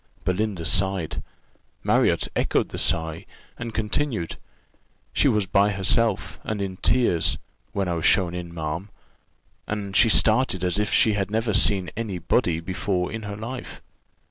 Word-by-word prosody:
Belinda 95 -2 -1
sighed 85 -2 +1 0.6
Marriott - - +2
echoed - - +1
the - - -5
sigh, 80 -1 -1 0.3
and 120 -1 -4
continued 110 - -2 0.8
"She - - +3
was 105 -2 +2
by 100 +2 +3
herself, 100 +2 +1
and 110 -1 -3
in 95 -2 -4
tears, 115 -10 +2 0.3
when 100 -2 -1
I 90 - 0
was 85 -1 -2
shown 90 -3 +3
in, 90 -1 -6
ma'am, 85 +4 -4 0.8
and 100 -2 -4
she 115 - +6
started 110 -4 +3
as 90 +2 +1
if 105 -1 0
she 110 - +4
had 100 -1 -1
never 110 +1 0
seen 95 -4 +3
any 105 -4 -3
body 85 -1 +1
before 90 +1 -2
in 110 - -5
her 100 - -5
life. 120 +4 -7
100 Hz, 150 wpm, -24 LUFS, 90-110 Hz, 0.8 s, she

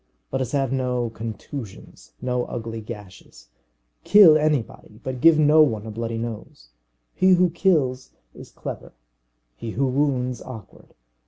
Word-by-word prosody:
Let - - -1
us 130 -2 -3
have 135 -3 0
no 125 -3 -1
contusions, 110 0 -9
no 125 -1 -1
ugly 115 -1 -6
gashes. 105 - -12 0.5
Kill 195 -7 +8
anybody, 150 -8 -1
but 130 -2 -5
give 165 +1 +6
no 155 +1 +5
one 110 -8 +1
a 110 - -6
bloody 115 +1 -4
nose. 110 - -7 0.4
He 185 0 +4
who 180 -1 +3
kills 150 -8 +1 0.2
is - - -12
clever, - - -8 0.6
he 115 - -7
who 135 - +2
wounds 130 -2 0
awkward. 115 -7 -12
125 Hz, 140 wpm, -23 LUFS, 115-145 Hz, 0.6 s, Kill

